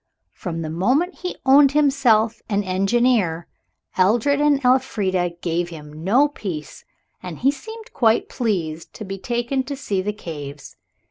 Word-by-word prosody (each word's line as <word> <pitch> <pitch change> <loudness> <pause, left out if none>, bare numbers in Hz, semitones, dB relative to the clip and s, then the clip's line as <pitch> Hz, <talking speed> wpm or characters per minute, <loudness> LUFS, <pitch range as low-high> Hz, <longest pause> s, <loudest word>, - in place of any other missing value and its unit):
From 165 -4 -5
the 155 - -4
moment 255 - 0
he 360 - -4
owned 275 +1 +6
himself 250 -7 +3
an 205 -1 +1
engineer 195 -2 +1 0.5
Edred 240 +9 +3
and 295 -2 +3
Elfrida 200 -9 +1
gave 170 0 -1
him 155 -1 -10
no 245 +11 +4
peace, 180 - -7 0.4
and 180 -4 -7
he 270 +3 +3
seemed 440 +10 -11
quite 225 -3 +2
pleased 170 - -3
to 215 - -7
be 195 0 -6
taken 240 +4 -1
to 280 +2 -5
see 205 -9 -2
the 205 +2 -2
caves. 145 -8 -8
215 Hz, 145 wpm, -22 LUFS, 175-265 Hz, 0.5 s, owned